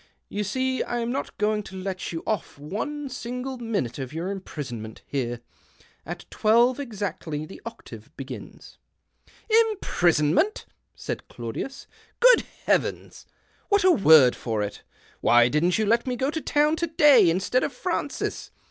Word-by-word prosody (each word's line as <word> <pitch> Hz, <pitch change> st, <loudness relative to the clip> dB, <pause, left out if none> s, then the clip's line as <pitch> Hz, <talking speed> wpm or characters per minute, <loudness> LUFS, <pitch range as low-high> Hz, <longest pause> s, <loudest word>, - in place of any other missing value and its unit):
You 210 Hz, -, -2 dB
see 260 Hz, +5 st, -1 dB
I 240 Hz, -, -2 dB
am 235 Hz, 0 st, -1 dB
not 275 Hz, -, -4 dB
going 210 Hz, 0 st, +1 dB
to 195 Hz, -, -11 dB
let 185 Hz, -1 st, -4 dB
you 165 Hz, -1 st, -5 dB
off 215 Hz, -9 st, -3 dB
one 225 Hz, -, -4 dB
single 250 Hz, +1 st, -5 dB
minute 205 Hz, -, -2 dB
of 130 Hz, -1 st, -5 dB
your 170 Hz, +5 st, -3 dB
imprisonment 125 Hz, -, -7 dB
bere. 120 Hz, -4 st, -2 dB, 0.7 s
At -, -, -6 dB
twelve 235 Hz, +4 st, +3 dB
exactly 200 Hz, -, -4 dB
the 190 Hz, -, -12 dB
octave -, -, -10 dB
begins." -, -, -9 dB, 0.3 s
" -, -, -30 dB, 0.2 s
Imprisonment! 175 Hz, -, +1 dB, 0.2 s
" -, -, -50 dB
said -, -, -4 dB
Claudius. 120 Hz, -, -6 dB, 0.2 s
" -, -, -33 dB
Good -, -, +6 dB, 0.2 s
iieavens! -, -, -1 dB, 0.4 s
what 405 Hz, -2 st, +3 dB
a 375 Hz, -, +6 dB
word 155 Hz, -, +7 dB
for 110 Hz, -3 st, -2 dB
it. 100 Hz, -, -6 dB, 0.4 s
Why 120 Hz, 0 st, +5 dB
didn't 165 Hz, +6 st, +2 dB
you 220 Hz, -, +1 dB
let 230 Hz, +4 st, +2 dB
me 250 Hz, -, 0 dB
go 265 Hz, +3 st, 0 dB
to 320 Hz, -, -3 dB
town 300 Hz, +2 st, +2 dB
to 340 Hz, -, -1 dB
day 295 Hz, -, +6 dB
instead 190 Hz, +9 st, +1 dB
of -, -, -1 dB
Francis -, -, -3 dB
210 Hz, 155 wpm, -25 LUFS, -, 0.7 s, word